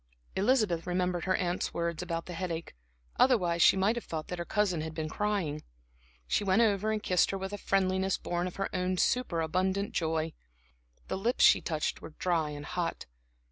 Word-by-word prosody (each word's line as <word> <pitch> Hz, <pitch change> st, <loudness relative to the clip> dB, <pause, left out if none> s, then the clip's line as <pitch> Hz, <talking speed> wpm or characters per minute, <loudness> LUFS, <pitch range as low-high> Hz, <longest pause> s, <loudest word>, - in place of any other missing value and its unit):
Elizabeth 195 Hz, -6 st, +2 dB
remembered 180 Hz, -1 st, 0 dB
her 185 Hz, 0 st, +2 dB
aunt's 175 Hz, 0 st, -1 dB
words 170 Hz, -1 st, -1 dB
about 165 Hz, -2 st, -3 dB
the 180 Hz, -, -7 dB
headache; 170 Hz, -1 st, -4 dB, 0.5 s
otherwise 180 Hz, -10 st, +3 dB
she -, -, +7 dB
might 200 Hz, +5 st, +2 dB
have 235 Hz, -, -4 dB
thought 155 Hz, -2 st, -5 dB
that 180 Hz, -, -4 dB
her 170 Hz, -, -3 dB
cousin 195 Hz, -6 st, +1 dB
had 160 Hz, 0 st, -5 dB
been 160 Hz, -1 st, -2 dB
crying. 180 Hz, -5 st, -1 dB, 0.6 s
She -, -, 0 dB
went 195 Hz, +4 st, +4 dB
over 215 Hz, 0 st, +2 dB
and 215 Hz, -1 st, -2 dB
kissed 180 Hz, -2 st, +3 dB
her 195 Hz, -, -2 dB
with 190 Hz, +1 st, -5 dB
a -, -, -3 dB
friendliness 190 Hz, 0 st, +1 dB
born 175 Hz, +1 st, -2 dB
of 180 Hz, -, -7 dB
her 195 Hz, 0 st, -3 dB
own 185 Hz, 0 st, 0 dB
superabundant 190 Hz, -2 st, 0 dB
joy. 160 Hz, -1 st, -1 dB, 0.7 s
The -, -, -3 dB
lips 235 Hz, +6 st, +1 dB
she -, -, +7 dB
touched 155 Hz, -3 st, -2 dB
were 150 Hz, -, -10 dB
dry 165 Hz, -4 st, +1 dB
and 145 Hz, 0 st, -7 dB
hot. 175 Hz, -2 st, -3 dB
180 Hz, 185 wpm, -30 LUFS, 165-195 Hz, 0.7 s, she